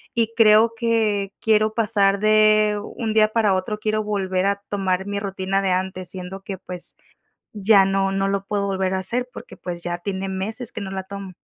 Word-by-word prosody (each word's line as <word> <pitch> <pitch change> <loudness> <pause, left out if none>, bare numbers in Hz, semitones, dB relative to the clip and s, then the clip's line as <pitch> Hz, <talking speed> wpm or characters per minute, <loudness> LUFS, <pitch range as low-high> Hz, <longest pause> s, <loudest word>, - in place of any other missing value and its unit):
y 230 -1 +1
creo 225 0 +5
que 220 -4 0
quiero 215 -1 +2
pasar 205 -3 +2
de 215 0 +4
un 225 0 -4
día 215 -1 +5
para 215 -3 +2
otro, 190 +3 -2
quiero 215 0 -1
volver 190 -3 -1
a 200 0 -1
tomar 190 -2 -1
mi 200 0 -3
rutina 195 -1 -2
de 195 - 0
antes, 185 -1 -2
siendo 185 +1 -7
que, 195 -1 -6
pues, 180 -1 -6 0.6
ya 205 -1 +5
no 195 0 +1
no 195 0 0
lo 195 0 -1
puedo 200 0 -1
volver 190 -1 -1
a - - 0
hacer 245 +6 -2
porque, - - -11
pues, 175 -1 -6
ya 175 0 -3
tiene 190 +1 -4
meses 215 +5 -4
que 220 - -6
no 195 - -5
la 190 0 -4
tomo. 195 -1 -8
200 Hz, 200 wpm, -22 LUFS, 190-215 Hz, 0.6 s, creo